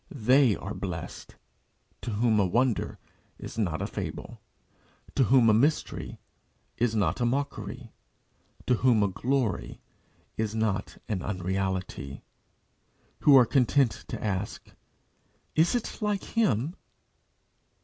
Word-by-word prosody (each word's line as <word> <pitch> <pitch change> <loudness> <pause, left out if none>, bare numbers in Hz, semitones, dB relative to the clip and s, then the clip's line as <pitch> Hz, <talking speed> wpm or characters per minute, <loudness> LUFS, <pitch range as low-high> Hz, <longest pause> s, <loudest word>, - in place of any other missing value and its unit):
They 130 -2 +4
are - - -6
blessed - - -6 0.7
to - - -5
whom 110 0 +2
a 100 - +4
wonder 120 +4 0 0.4
is - - -7
not 85 -7 -1
a - - -1
fable, - - -6 0.7
to 135 - +3
whom 125 -1 +5
a 110 - +6
mystery 140 +8 0 0.6
is 115 -2 0
not 100 -1 +1
a - - +3
mockery, 120 -3 -3 0.7
to 125 - +3
whom 120 -4 +4
a - - +3
glory 105 - -1 0.6
is 110 -1 -1
not 105 -3 -1
an 100 -4 -2
unreality 95 -7 -3 1.0
who 140 -2 +7
are 125 - +7
content 130 0 +3 0.2
to - - -6
ask, 100 -1 -3 0.8
"Is 165 +8 +3
it 240 - -3
like 210 -2 0
Him?" 160 - 0
115 Hz, 120 wpm, -28 LUFS, 100-130 Hz, 1.0 s, who